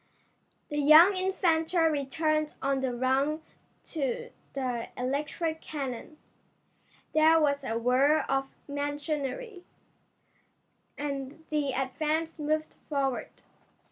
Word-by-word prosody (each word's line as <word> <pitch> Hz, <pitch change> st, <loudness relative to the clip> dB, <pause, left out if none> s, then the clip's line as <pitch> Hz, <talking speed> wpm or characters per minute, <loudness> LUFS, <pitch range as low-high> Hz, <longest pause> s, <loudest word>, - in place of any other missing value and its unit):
The 295 Hz, -1 st, -2 dB
young 315 Hz, +7 st, +8 dB
inventor 360 Hz, -3 st, +1 dB
returned 305 Hz, +2 st, 0 dB
on 275 Hz, 0 st, 0 dB
the 265 Hz, -1 st, -1 dB
run 265 Hz, +5 st, +1 dB, 0.4 s
to 310 Hz, -, -3 dB, 0.2 s
the 250 Hz, -4 st, -2 dB
electric 300 Hz, +5 st, -2 dB
cannon. 275 Hz, 0 st, -5 dB, 1.0 s
There 315 Hz, +1 st, +6 dB
was 285 Hz, -2 st, +1 dB
a 225 Hz, -3 st, -2 dB
whir 265 Hz, +6 st, +3 dB
of 270 Hz, 0 st, 0 dB, 0.2 s
machinery, 290 Hz, -, -3 dB, 1.3 s
and 280 Hz, +1 st, -5 dB
the 290 Hz, -3 st, 0 dB
Advance 310 Hz, +5 st, -1 dB
moved 310 Hz, +1 st, -1 dB
forward. 275 Hz, -4 st, -1 dB
295 Hz, 95 wpm, -29 LUFS, 270-315 Hz, 1.3 s, young